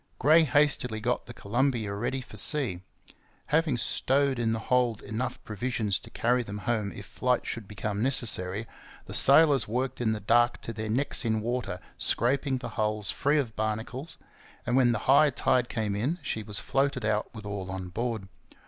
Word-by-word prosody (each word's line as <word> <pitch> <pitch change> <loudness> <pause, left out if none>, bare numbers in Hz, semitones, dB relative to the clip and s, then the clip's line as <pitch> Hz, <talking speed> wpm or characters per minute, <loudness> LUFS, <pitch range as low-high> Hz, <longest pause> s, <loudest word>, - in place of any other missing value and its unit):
Gray 160 +4 +5
hastily 135 -5 +2
got 120 +3 -2
the - - -8
Columbia 115 -1 -1
ready 130 +6 -2
for 125 - -13
sea. 125 - +2 0.7
Having 155 -4 +2
stowed 135 +2 +1
in 115 -1 +1
the 115 - 0
hold 120 -2 0
enough 120 +5 -3
provisions 110 -2 -2
to - - -14
carry 125 +2 +1
them 105 -3 -6
home 110 -4 0
if 100 - -9
flight 125 +4 -1
should 115 -4 -5
become 105 0 -4
necessary, 110 -5 +1 0.4
the - - -9
sailors 140 -4 +6
worked 125 +3 -2
in 110 -2 +1
the 110 - -2
dark 120 +4 +3
to 115 - -5
their 110 0 -5
necks 135 +5 0
in 110 -2 0
water 120 -4 -3 0.2
scraping 135 +2 +1
the 125 - -6
hull 105 -1 -2
free 145 +9 +1
of 120 -7 -2
barnacles, 110 +7 -3 0.5
and 125 - 0
when 130 -2 +4
the 115 - 0
high 140 +3 +6
tide 120 -1 +1
came 105 -3 -2
in, 130 +12 -1
she 110 - -3
was 105 -1 -2
floated 135 +1 0
out 105 0 0
with 110 -2 -8
all 100 -2 -5
on 95 -1 -5
board. 115 0 -3
120 Hz, 180 wpm, -28 LUFS, 105-130 Hz, 0.7 s, sailors